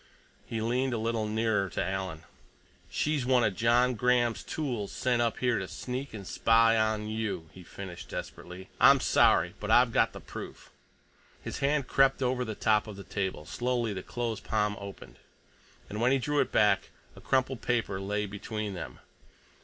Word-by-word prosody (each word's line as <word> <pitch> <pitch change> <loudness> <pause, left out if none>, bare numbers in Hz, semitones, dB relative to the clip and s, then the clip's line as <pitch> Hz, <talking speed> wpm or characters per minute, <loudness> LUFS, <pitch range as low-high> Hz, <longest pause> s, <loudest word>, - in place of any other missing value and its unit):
He 115 -1 -3
leaned 125 +3 0
a - - -1
little 115 -1 -1
nearer 110 -3 0
to - - -2
Alan. 95 -4 -4 0.7
"She's 150 -3 0
one 125 -1 +3
of 100 - +1
John 120 +3 +3
Graham's 120 0 +2
tools 125 -10 -3
sent 125 -2 0
up 115 -1 0
here 125 -3 +1
to 95 - -4
sneak 130 +5 -5
and 105 -3 -8
spy 115 +3 +4
on 110 -1 +1
you," 110 -7 -3
he 95 - -12
finished 90 0 -9
desperately. 90 +1 -7
"I'm - - +7
sorry—but - - +3
I've - - +5
got - - +3
the - - -8
proof." - - -9 0.7
His - - -5
hand 140 -1 +1
crept 135 0 +3
over 125 0 0
the 110 -3 -5
top 105 +1 +2
of 105 - -7
the 100 - -9
table; 95 -7 -3
slowly 120 0 -1
the 95 - -5
closed 115 +1 -4
palm 105 -1 0
opened, 100 -1 -10 0.7
and 105 +2 -5
when 125 +2 +4
he 135 - +4
drew 145 +3 0
it - - +1
back, - - +3 0.3
a - - -13
crumpled 130 -1 0
paper 110 -5 -1
lay 105 +2 -1
between 105 +1 -5
them. 85 -5 -7
115 Hz, 175 wpm, -29 LUFS, 100-125 Hz, 0.7 s, I'm